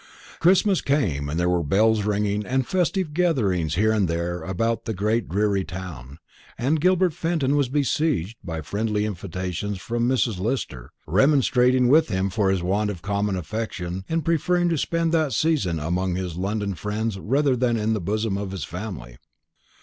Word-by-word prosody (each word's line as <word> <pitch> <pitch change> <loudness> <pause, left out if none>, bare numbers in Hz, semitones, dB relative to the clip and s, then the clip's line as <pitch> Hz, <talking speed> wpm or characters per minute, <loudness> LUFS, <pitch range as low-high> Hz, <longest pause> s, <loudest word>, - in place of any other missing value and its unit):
Christmas 190 +2 +4
came; 85 - 0
and 80 +4 -2
there 90 - +1
were 90 -1 +2
bells 105 +7 +3
ringing, 105 0 0
and 130 +4 0
festive 180 -1 0
gatherings 105 - +1
here 110 +4 +3
and 105 -4 +2
there 85 +1 -2
about 115 +7 -1
the 110 - -3
great 110 +4 0
dreary 100 +1 +1
town, 80 -7 -8 0.4
and 145 +6 +1
Gilbert 185 -1 +3
Fenton 160 -4 0
was 140 -4 +1
besieged 140 - 0
by 80 -3 -4
friendly 105 +5 -1
invitations 95 0 -4
from 120 +5 -1
Mrs. 115 -6 +1
Lister, 95 - -3 0.2
remonstrating 125 - +3
with 155 +6 +5
him 95 -2 -1
for 100 -1 +1
his 95 -2 0
want 100 +4 0
of 90 -5 -6
common 100 -1 0
affection 95 -1 -4
in 165 0 -1
preferring 175 +2 +1
to 165 - +1
spend 165 +2 0
that 155 -5 +1
season 120 - +1
among 90 +4 -1
his 90 -3 -4
London 100 +2 -2
friends 105 +4 -3
rather 135 +5 +2
than 120 -1 +1
in 110 +1 0
the 105 - -1
bosom 105 +2 -1
of 100 -1 -4
his 95 -5 -5
family. 80 - -7
105 Hz, 170 wpm, -24 LUFS, 90-135 Hz, 0.4 s, with